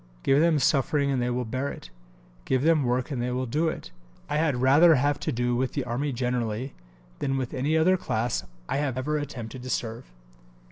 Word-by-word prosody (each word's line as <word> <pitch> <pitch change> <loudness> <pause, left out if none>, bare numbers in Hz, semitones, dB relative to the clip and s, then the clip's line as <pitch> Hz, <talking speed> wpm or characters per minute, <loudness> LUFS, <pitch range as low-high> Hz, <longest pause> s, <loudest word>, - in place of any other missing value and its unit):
Give 135 +1 +4
them 165 -1 +4
suffering 140 -1 +2
and 130 -2 0
they 120 - 0
will 125 0 -1
bear 130 +5 -2
it. - - -10 0.5
Give 130 0 +1
them 160 -1 +4
work 125 +3 0
and 130 -4 -2
they 125 - -1
will 130 +1 -1
do 150 +7 0
it. 155 - -5 0.4
I 150 - +1
had 155 -3 +2
rather 150 +6 +6
have 145 +2 +1
to - - -2
do 120 +1 0
with 130 +1 -1
the 140 - -1
Army 125 +5 -2
generally 125 0 -2 0.5
than 135 0 -1
with 130 0 -3
any 145 +4 +1
other 185 +4 +4
class 120 -9 -1 0.2
I - - -1
have 140 -4 -1
ever 150 +4 -1
attempted 130 -4 -6
to 130 - -7
serve." 115 - -4
130 Hz, 205 wpm, -26 LUFS, 125-145 Hz, 0.5 s, rather